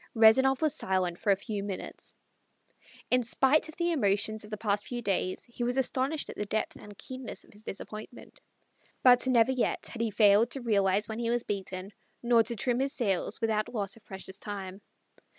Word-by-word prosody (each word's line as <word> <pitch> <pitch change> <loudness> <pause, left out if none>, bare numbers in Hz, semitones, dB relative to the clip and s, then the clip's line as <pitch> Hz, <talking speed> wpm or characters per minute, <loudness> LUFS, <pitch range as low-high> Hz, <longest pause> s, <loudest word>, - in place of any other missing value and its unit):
Rezanov 265 +6 +5
was 310 - +3
silent 185 -2 -1
for 205 - +2
a - - +5
few 200 +1 -5
minutes. 200 -1 -7 1.0
In 250 0 +5
spite 265 +6 +2
of 315 - -10
the 345 -1 0
emotions 215 -5 +1
of 210 - -11
the 215 - -4
past 205 -1 -1
few 245 - -4
days 185 -2 -1
he 240 0 -5
was 245 +2 0
astonished 265 +3 0
at - - -8
the 210 - -3
depth 215 +2 -2
and 205 -1 -12
keenness 260 -3 -7
of - - -21
his 210 +1 -14
disappointment. 215 +3 -9 0.6
But 250 0 +6
never 245 -1 +4
yet 255 -2 -1
had 230 - -5
he 230 - +1
failed 210 +2 +5
to 270 - -3
realize 200 -3 +2
when 220 +1 -5
he 235 -1 -1
was 240 0 +1
beaten, 195 -1 -5 0.3
nor 235 -1 +5
to 235 +1 -2
trim 240 +3 0
his 275 +1 0
sails 205 - 0
without 215 -1 0
loss 205 -4 -3
of 230 - -19
precious 190 0 -8
time. 195 -2 -6
220 Hz, 195 wpm, -29 LUFS, 200-245 Hz, 1.0 s, But